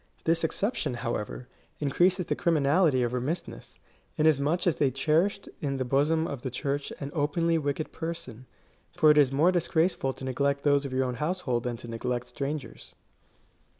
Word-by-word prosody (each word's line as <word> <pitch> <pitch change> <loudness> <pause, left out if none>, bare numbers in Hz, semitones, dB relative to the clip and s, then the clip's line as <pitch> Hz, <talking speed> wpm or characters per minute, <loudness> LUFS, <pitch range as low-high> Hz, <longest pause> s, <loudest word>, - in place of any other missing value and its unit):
This 165 0 +2
exception, 160 - -1
however, 120 0 -4 0.3
increases 175 +6 +2
the - - -1
criminality 150 -3 +3
of 120 0 -1
remissness, 150 +8 -4 0.4
inasmuch 155 +3 +2
as 175 - +2
they 140 - +3
cherished 160 - +1
in 140 -2 -2
the 130 - -2
bosom 150 +5 +2
of 140 -7 -5
the 130 - -3
Church 140 +2 -3
an 140 0 -5
openly 165 +2 +1
wicked 145 +1 -2
person; 130 -7 -6 0.5
for 155 - +6
it 150 - +3
is 135 -3 +4
more 155 +7 +4
disgraceful 170 -4 +1
to 130 - -8
neglect 140 +2 0
those 145 -1 +3
of 135 - -5
your 130 0 +1
own 125 - -2
household 150 -8 -1
than 120 -1 -2
to 120 - -10
neglect 120 +1 -3
strangers. 140 -3 -6
145 Hz, 165 wpm, -28 LUFS, 130-165 Hz, 0.5 s, for